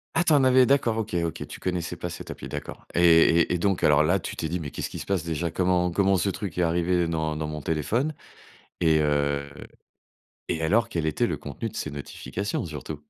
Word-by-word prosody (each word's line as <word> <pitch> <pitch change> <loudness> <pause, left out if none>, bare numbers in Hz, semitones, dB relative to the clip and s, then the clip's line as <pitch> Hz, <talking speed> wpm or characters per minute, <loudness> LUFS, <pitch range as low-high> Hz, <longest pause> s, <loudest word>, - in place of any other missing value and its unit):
Ah, 175 - +2
tu 160 - +4
en 140 -2 +5
avais 130 0 +6
d'accord, 125 -4 +2
OK, 110 -3 -3
OK, 85 0 -4
tu - - -10
connaissais 90 -2 -2
pas 90 +1 -5
cette 85 - -8
appli, - - -8
d'accord - - -7
et 85 0 +5
et - - +1
donc 95 +1 0
alors 75 0 +5
là, 90 +5 +2
tu - - -6
t'es 80 - -3
dit: 90 +1 -2
«Mais 75 -3 -5
qu'est-ce - - -5
qui - - -7
se - - -6
passe, 95 -4 0
déjà?», 85 +1 -2
«Comment 90 -1 +1
comment 95 +1 +3
ce 100 - +1
truc 95 -3 -5
est 90 - +2
arrivé 85 +1 +1
dans 80 -2 -1
dans 75 - -3
mon 75 0 -5
téléphone?» 110 - -1 0.7
et 80 -2 +4
heu 70 -1 0 1.0
et 80 - -1
alors 105 +7 +2
quel 80 -2 -2
était 80 - +1
le - - -2
contenu - - -6
de - - -11
ces - - -3
notifications, 90 +7 -4
surtout? 75 -2 -7
85 Hz, 225 wpm, -26 LUFS, 80-95 Hz, 1.0 s, avais